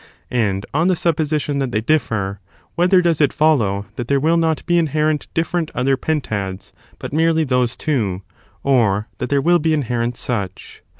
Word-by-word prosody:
And, 105 Hz, -5 st, 0 dB
on 160 Hz, +5 st, +2 dB
the 185 Hz, -, +3 dB
supposition 155 Hz, -3 st, 0 dB
that 135 Hz, -3 st, -1 dB
they 105 Hz, -, +1 dB
differ, 110 Hz, -7 st, 0 dB, 0.3 s
whether 180 Hz, +1 st, +3 dB
does 165 Hz, -3 st, +2 dB
it 145 Hz, -, +4 dB
follow 115 Hz, -11 st, +2 dB
that 120 Hz, -, -4 dB
there 140 Hz, +1 st, +2 dB
will 160 Hz, +4 st, +2 dB
not 165 Hz, -2 st, 0 dB
be 175 Hz, 0 st, +3 dB
inherent 155 Hz, -1 st, 0 dB
different 165 Hz, 0 st, 0 dB
other 135 Hz, +2 st, +2 dB
pentads, 110 Hz, -11 st, -3 dB, 0.2 s
but -, -, -7 dB
merely 160 Hz, +1 st, +2 dB
those 125 Hz, -4 st, 0 dB
two, 105 Hz, -11 st, -1 dB, 0.4 s
or 110 Hz, -6 st, +2 dB
that -, -, -3 dB
there 140 Hz, -1 st, +2 dB
will 175 Hz, +2 st, +4 dB
be 160 Hz, 0 st, +1 dB
inherent 120 Hz, -3 st, -1 dB
such? 100 Hz, -7 st, -5 dB
140 Hz, 170 wpm, -19 LUFS, 115-160 Hz, 0.4 s, it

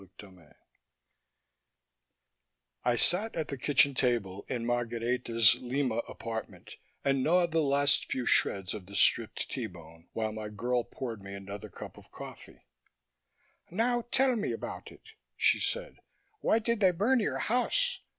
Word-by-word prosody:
CHAPTER 100 Hz, -, -10 dB
XI 90 Hz, -5 st, -20 dB, 2.3 s
I 120 Hz, -, +3 dB
sat 185 Hz, -, +2 dB
at 160 Hz, -, -3 dB
the 140 Hz, -, -4 dB
kitchen 140 Hz, +1 st, +4 dB
table 115 Hz, -7 st, 0 dB
in 120 Hz, -2 st, -2 dB
Margareta's 120 Hz, -1 st, +2 dB
Lima 125 Hz, -2 st, -1 dB
apartment 110 Hz, -1 st, -7 dB, 0.3 s
and 135 Hz, -1 st, +2 dB
gnawed 170 Hz, +2 st, +3 dB
the 165 Hz, 0 st, +2 dB
last 140 Hz, 0 st, +2 dB
few 125 Hz, -2 st, -1 dB
shreds 95 Hz, -4 st, +2 dB
off 95 Hz, -4 st, -8 dB
the 100 Hz, -, -9 dB
stripped -, -, +3 dB
T -, -, -3 dB
bone, 85 Hz, -1 st, -15 dB
while 110 Hz, -1 st, -1 dB
my 105 Hz, 0 st, -6 dB
girl 120 Hz, +3 st, -1 dB
poured 115 Hz, -5 st, -6 dB
me 100 Hz, 0 st, -8 dB
another 100 Hz, +1 st, -8 dB
cup -, -, -10 dB
of -, -, -18 dB
coffee. -, -, -11 dB, 1.0 s
"Now 235 Hz, +5 st, 0 dB
tell 265 Hz, 0 st, +3 dB
me 210 Hz, -2 st, -1 dB
about -, -, -7 dB
it," -, -, -17 dB, 0.3 s
she -, -, +4 dB
said. -, -, -3 dB, 0.4 s
"Why -, -, +3 dB
did 230 Hz, 0 st, 0 dB
they 190 Hz, -3 st, +5 dB
burn 210 Hz, +9 st, +2 dB
your 210 Hz, -, -1 dB
house? 365 Hz, -, +1 dB
125 Hz, 150 wpm, -30 LUFS, 110-180 Hz, 2.3 s, they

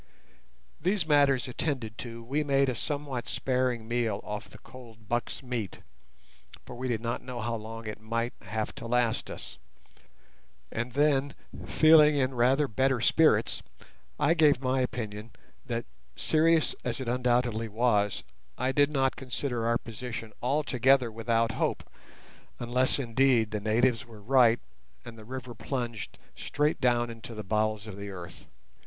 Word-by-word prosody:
These 185 Hz, +1 st, +1 dB
matters 140 Hz, -4 st, +3 dB
attended 125 Hz, -4 st, -3 dB
to, 115 Hz, -3 st, -7 dB
we 140 Hz, +6 st, -1 dB
made 140 Hz, -1 st, +2 dB
a 125 Hz, -, -2 dB
somewhat 140 Hz, -2 st, -3 dB
sparing 125 Hz, -3 st, 0 dB
meal 120 Hz, -3 st, 0 dB
off 105 Hz, 0 st, -6 dB
the -, -, -13 dB
cold 115 Hz, -4 st, -14 dB
buck's 120 Hz, +4 st, -2 dB
meat 120 Hz, -6 st, -4 dB, 0.8 s
(for -, -, -9 dB
we 130 Hz, +2 st, -4 dB
did 115 Hz, -3 st, -1 dB
not 115 Hz, 0 st, -2 dB
know 125 Hz, -1 st, -6 dB
how 120 Hz, +1 st, -2 dB
long 115 Hz, 0 st, -6 dB
it 110 Hz, 0 st, -6 dB
might 115 Hz, +2 st, -2 dB
have 110 Hz, +3 st, -3 dB
to 115 Hz, -, -6 dB
last 120 Hz, -1 st, +1 dB
us), -, -, -8 dB, 1.1 s
and 120 Hz, +1 st, -3 dB
then 145 Hz, -1 st, +2 dB, 0.3 s
feeling 155 Hz, -1 st, +6 dB
in 135 Hz, -2 st, +1 dB
rather 130 Hz, +4 st, +3 dB
better 130 Hz, +2 st, +1 dB
spirits 160 Hz, +6 st, +3 dB, 0.6 s
I 160 Hz, -, +4 dB
gave 150 Hz, -5 st, +4 dB
my 130 Hz, 0 st, +1 dB
opinion 110 Hz, -3 st, -4 dB, 0.3 s
that, 115 Hz, -1 st, -2 dB, 0.3 s
serious 160 Hz, 0 st, +3 dB
as 120 Hz, -3 st, -2 dB
it 130 Hz, -, -5 dB
undoubtedly 120 Hz, -2 st, +1 dB
was, 105 Hz, -2 st, +1 dB, 0.3 s
I 130 Hz, +1 st, 0 dB
did 145 Hz, +1 st, +4 dB
not 135 Hz, -3 st, +1 dB
consider 125 Hz, -2 st, -3 dB
our 115 Hz, 0 st, +3 dB
position 115 Hz, -1 st, -7 dB
altogether 130 Hz, -2 st, +2 dB
without 115 Hz, +1 st, +1 dB
hope, -, -, -2 dB, 0.7 s
unless, 125 Hz, +2 st, +1 dB
indeed, 120 Hz, -3 st, +2 dB
the 105 Hz, -1 st, -2 dB
natives 115 Hz, +3 st, +2 dB
were 110 Hz, -2 st, -13 dB
right, 120 Hz, -1 st, +5 dB, 0.5 s
and 120 Hz, -1 st, -9 dB
the 110 Hz, -1 st, -12 dB
river 125 Hz, 0 st, -6 dB
plunged 115 Hz, -1 st, -4 dB, 0.2 s
straight 150 Hz, 0 st, -1 dB
down 120 Hz, -2 st, +2 dB
into 115 Hz, 0 st, -9 dB
the 110 Hz, -, -5 dB
bowels 110 Hz, +1 st, 0 dB
of 105 Hz, -3 st, -8 dB
the 100 Hz, 0 st, -6 dB
earth. 90 Hz, -2 st, -9 dB
120 Hz, 150 wpm, -29 LUFS, 115-135 Hz, 1.1 s, feeling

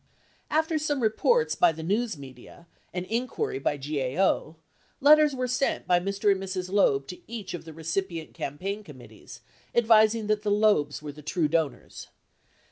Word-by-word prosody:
After 315 Hz, 0 st, +1 dB
some 295 Hz, -2 st, -1 dB
reports 465 Hz, -, +2 dB
by 175 Hz, -, +4 dB
the 160 Hz, 0 st, -8 dB
news 210 Hz, +2 st, -1 dB
media 135 Hz, +4 st, -13 dB, 0.3 s
and 180 Hz, 0 st, -4 dB
inquiry 230 Hz, -, -2 dB
by 145 Hz, +1 st, -1 dB
GAO, 145 Hz, +4 st, -1 dB, 0.4 s
letters 300 Hz, 0 st, +6 dB
were 255 Hz, -1 st, -1 dB
sent 250 Hz, +3 st, -1 dB
by 175 Hz, -1 st, +3 dB
Mr. 200 Hz, +2 st, +1 dB
and 195 Hz, -1 st, 0 dB
Mrs. 185 Hz, -1 st, -4 dB
Loeb 140 Hz, -9 st, +3 dB
to 180 Hz, -, -7 dB
each 210 Hz, -5 st, -6 dB
of 175 Hz, -, -7 dB
the 160 Hz, -, -9 dB
recipient 165 Hz, +1 st, -4 dB
campaign 195 Hz, +9 st, -5 dB
committees 145 Hz, -9 st, -13 dB, 0.3 s
advising 220 Hz, -1 st, +4 dB
that 210 Hz, 0 st, 0 dB
the 210 Hz, -, -2 dB
Loebs 205 Hz, -9 st, +2 dB
were 150 Hz, -, -5 dB
the 150 Hz, +1 st, -13 dB
true 155 Hz, +2 st, 0 dB
donors. 160 Hz, -1 st, -2 dB
190 Hz, 160 wpm, -27 LUFS, 155-220 Hz, 0.4 s, letters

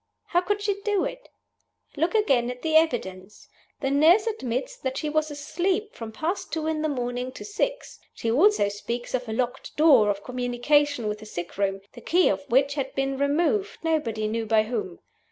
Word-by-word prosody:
How 350 Hz, -, +3 dB
could 410 Hz, +3 st, -2 dB
she 400 Hz, -1 st, -1 dB
do 410 Hz, -2 st, +1 dB
it? -, -, -7 dB, 0.7 s
Look 330 Hz, +7 st, 0 dB
again 270 Hz, -, +3 dB
at 250 Hz, 0 st, -7 dB
the 315 Hz, -1 st, 0 dB
evidence. 210 Hz, -, 0 dB, 0.3 s
The 270 Hz, -1 st, 0 dB
nurse 325 Hz, +9 st, +5 dB
admits 260 Hz, -, -3 dB
that 260 Hz, 0 st, -3 dB
she 305 Hz, -, -2 dB
was 310 Hz, +1 st, 0 dB
asleep 365 Hz, +8 st, -2 dB
from 225 Hz, -1 st, -7 dB
past 325 Hz, -, -3 dB
two 320 Hz, -1 st, -2 dB
in 315 Hz, -1 st, -1 dB
the 310 Hz, -, 0 dB
morning 250 Hz, -1 st, -3 dB
to -, -, -9 dB
six. -, -, -3 dB, 0.2 s
She 225 Hz, -, -2 dB
also 335 Hz, -, +4 dB
speaks 235 Hz, +4 st, -5 dB
of 250 Hz, -2 st, -2 dB
a -, -, -2 dB
locked 245 Hz, +2 st, -3 dB
door 275 Hz, -9 st, +6 dB
of 200 Hz, 0 st, -2 dB
communication 250 Hz, +1 st, +1 dB
with 210 Hz, 0 st, -3 dB
the 215 Hz, -, -11 dB
sickroom, 195 Hz, +1 st, -3 dB
the 240 Hz, -, -11 dB
key 355 Hz, +9 st, +3 dB
of 190 Hz, -1 st, -2 dB
which 270 Hz, +3 st, +3 dB
had 275 Hz, -2 st, -4 dB
been 270 Hz, 0 st, -1 dB
removed, 340 Hz, +9 st, +1 dB
nobody 235 Hz, -10 st, 0 dB
knew 225 Hz, +1 st, -2 dB
by 215 Hz, 0 st, +4 dB
whom. 215 Hz, -6 st, -4 dB
270 Hz, 190 wpm, -25 LUFS, 230-325 Hz, 0.7 s, door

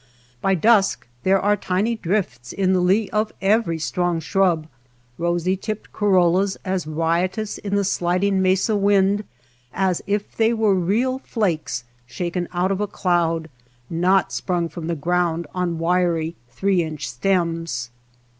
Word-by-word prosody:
By 195 Hz, 0 st, +2 dB
dusk 210 Hz, +2 st, +3 dB, 0.2 s
there 190 Hz, +1 st, +3 dB
are 205 Hz, +2 st, +2 dB
tiny 205 Hz, +4 st, 0 dB
drifts 170 Hz, -, -2 dB
in 190 Hz, -1 st, +1 dB
the 185 Hz, -, +3 dB
lee 195 Hz, +4 st, +2 dB
of 215 Hz, 0 st, 0 dB
every 195 Hz, -4 st, +2 dB
strong 175 Hz, +2 st, -1 dB
shrub, 170 Hz, -1 st, +1 dB, 0.5 s
rosy 175 Hz, +2 st, +1 dB
tipped 215 Hz, +2 st, -6 dB
corollas 190 Hz, -1 st, +2 dB
as 185 Hz, -4 st, -2 dB
riot 165 Hz, +5 st, 0 dB
ous 215 Hz, -1 st, -4 dB
in 200 Hz, -1 st, -3 dB
the 200 Hz, -, +2 dB
sliding 190 Hz, +1 st, +1 dB
mesa 190 Hz, +3 st, +2 dB
wind 200 Hz, 0 st, +3 dB, 0.5 s
as 190 Hz, -3 st, 0 dB
if 205 Hz, +1 st, -2 dB
they 225 Hz, +1 st, +3 dB
were 220 Hz, -3 st, +2 dB
real 220 Hz, +9 st, +1 dB
flakes 170 Hz, -, -2 dB, 0.2 s
shaken 175 Hz, +5 st, -3 dB
out 180 Hz, +2 st, 0 dB
of 195 Hz, +1 st, -1 dB
a 210 Hz, -, 0 dB
cloud, 170 Hz, -4 st, 0 dB, 0.4 s
not 180 Hz, -1 st, +2 dB
sprung 170 Hz, +7 st, -1 dB
from 165 Hz, +1 st, -7 dB
the 170 Hz, -, -1 dB
ground 170 Hz, +1 st, 0 dB
on 180 Hz, -2 st, -1 dB
wiry 170 Hz, -1 st, +1 dB
three 190 Hz, +8 st, +1 dB
inch 155 Hz, -2 st, -4 dB
stems. 165 Hz, -9 st, -1 dB
185 Hz, 145 wpm, -22 LUFS, 170-200 Hz, 0.5 s, dusk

